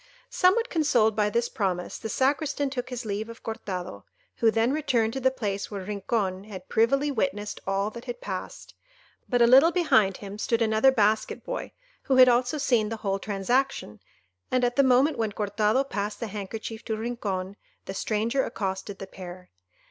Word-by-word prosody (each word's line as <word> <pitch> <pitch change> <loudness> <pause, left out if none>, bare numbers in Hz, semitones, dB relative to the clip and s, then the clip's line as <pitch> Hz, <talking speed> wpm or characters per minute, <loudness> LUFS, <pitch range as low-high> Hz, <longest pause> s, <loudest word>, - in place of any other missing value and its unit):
Somewhat 415 +6 +3
consoled 240 - +3
by 210 -1 +2
this 235 +3 0
promise, 185 -6 -2
the 220 - -5
Sacristan 285 +2 0
took 255 -1 -4
his 245 -2 -5
leave 215 +2 -3
of 230 - -11
Cortado, 185 - -5 0.3
who 230 - +4
then 225 +3 +2
returned 255 -7 +1
to 265 - -3
the 260 0 +3
place 205 -6 -3
where 200 -2 -5
Rincon 200 -1 -2
had 190 -4 -9
privily 275 +6 +2
witnessed 220 -5 -2
all 195 +2 0
that 235 +2 -10
had 245 -1 -5
passed. 190 -5 -6 0.6
But 245 -2 +4
a - - +7
little 270 +8 +7
behind 220 - +3
him 200 0 -8
stood 230 +1 +1
another 220 +4 +4
basket 215 -3 +1
boy, - - -5 0.3
who 265 - +1
had 255 0 +8
also 245 +4 +2
seen 235 -6 +2
the 225 - -4
whole 195 0 0
transaction; 205 - -1 0.5
and 255 -1 +1
at 245 0 +1
the 280 - +5
moment 265 +3 +3
when 220 -2 -1
Cortado 210 +4 +1
passed 210 -3 -3
the 235 - -3
handkerchief 215 +2 -6
to 220 -2 -2
Rincon, 200 -5 -3 0.3
the 195 - -5
stranger 225 +6 0
accosted 195 0 -4
the 195 - -7
pair. 180 -1 -10
225 Hz, 180 wpm, -26 LUFS, 200-255 Hz, 0.6 s, had